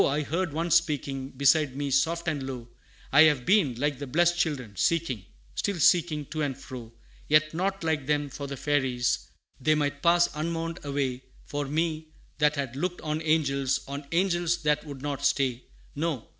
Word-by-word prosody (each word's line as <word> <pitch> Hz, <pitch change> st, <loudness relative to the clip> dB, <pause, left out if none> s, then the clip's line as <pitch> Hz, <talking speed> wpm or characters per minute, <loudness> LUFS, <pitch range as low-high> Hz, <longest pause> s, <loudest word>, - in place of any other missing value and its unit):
I 145 Hz, +2 st, +1 dB
heard 170 Hz, +4 st, -1 dB
one 165 Hz, +3 st, -2 dB
speaking 140 Hz, -5 st, +1 dB
Beside 140 Hz, +1 st, +3 dB
me 140 Hz, 0 st, -2 dB
soft 165 Hz, +5 st, +1 dB
and 155 Hz, -3 st, -1 dB
low, 130 Hz, -3 st, -6 dB, 0.4 s
"I 140 Hz, +2 st, +7 dB
have 145 Hz, -5 st, +2 dB
been, 185 Hz, -, +3 dB
like 145 Hz, +2 st, -1 dB
the 140 Hz, -, -5 dB
blessed 170 Hz, +6 st, +3 dB
children, 135 Hz, -, -2 dB
seeking, 135 Hz, -, 0 dB, 0.3 s
Still 200 Hz, -2 st, -1 dB
seeking, 155 Hz, -3 st, +3 dB
to 155 Hz, -, -2 dB
and 140 Hz, -3 st, -1 dB
fro; 125 Hz, -4 st, -9 dB, 0.4 s
Yet 155 Hz, +1 st, +3 dB
not, 190 Hz, +2 st, -1 dB
like 155 Hz, -4 st, -1 dB
them, 145 Hz, -1 st, +1 dB
for 140 Hz, +1 st, -6 dB
the 140 Hz, 0 st, -6 dB
Fairies, 135 Hz, -5 st, +1 dB, 0.4 s
They 155 Hz, +4 st, +3 dB
might 145 Hz, -1 st, -1 dB
pass 170 Hz, 0 st, +5 dB
unmourned 165 Hz, +2 st, -3 dB
away 135 Hz, -3 st, -2 dB, 0.2 s
For 145 Hz, -1 st, -3 dB
me, 155 Hz, +1 st, -1 dB, 0.3 s
that 150 Hz, 0 st, +3 dB
had 135 Hz, -3 st, -3 dB
looked 175 Hz, +5 st, -3 dB
on 155 Hz, 0 st, -2 dB
angels, 140 Hz, -4 st, +1 dB
On 140 Hz, +1 st, -5 dB
angels 175 Hz, -1 st, +1 dB
that 150 Hz, -1 st, +2 dB
would 140 Hz, -2 st, -8 dB
not 140 Hz, -1 st, -3 dB
stay; 130 Hz, -3 st, +1 dB, 0.3 s
No! 150 Hz, -5 st, -2 dB
150 Hz, 175 wpm, -27 LUFS, 135-165 Hz, 0.4 s, I